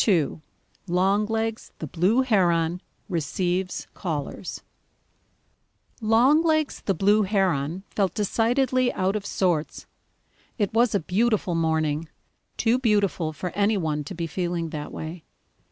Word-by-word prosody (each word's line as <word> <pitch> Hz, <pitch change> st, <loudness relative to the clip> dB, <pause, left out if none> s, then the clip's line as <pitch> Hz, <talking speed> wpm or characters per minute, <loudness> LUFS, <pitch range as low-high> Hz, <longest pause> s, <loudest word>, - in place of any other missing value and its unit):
II 165 Hz, -7 st, +2 dB, 0.5 s
LONGLEGS 210 Hz, +5 st, 0 dB
THE -, -, -5 dB
BLUE 185 Hz, -, +2 dB
HERON 175 Hz, -7 st, +2 dB, 0.3 s
RECEIVES 180 Hz, +1 st, -1 dB
CALLERS 160 Hz, +1 st, -5 dB, 1.4 s
Longlegs 295 Hz, +8 st, +3 dB
the 195 Hz, -, +1 dB
Blue 205 Hz, +5 st, +4 dB
Heron 185 Hz, -4 st, 0 dB
felt 195 Hz, -4 st, 0 dB
decidedly 245 Hz, +4 st, +2 dB
out 190 Hz, +2 st, 0 dB
of 205 Hz, -1 st, -3 dB
sorts. 175 Hz, -5 st, -1 dB, 0.7 s
It 205 Hz, -4 st, 0 dB
was 230 Hz, -1 st, +3 dB
a -, -, +3 dB
beautiful 200 Hz, +2 st, +1 dB
morning, 160 Hz, -1 st, 0 dB, 0.5 s
too 240 Hz, +2 st, +2 dB
beautiful 205 Hz, -8 st, +1 dB
for 175 Hz, +4 st, -5 dB
any 205 Hz, +1 st, +2 dB
one 155 Hz, -4 st, -1 dB
to 190 Hz, -, -7 dB
be 170 Hz, 0 st, -3 dB
feeling 170 Hz, 0 st, -2 dB
that 150 Hz, -1 st, -5 dB
way. 160 Hz, +1 st, -7 dB
190 Hz, 120 wpm, -25 LUFS, 165-220 Hz, 1.4 s, Blue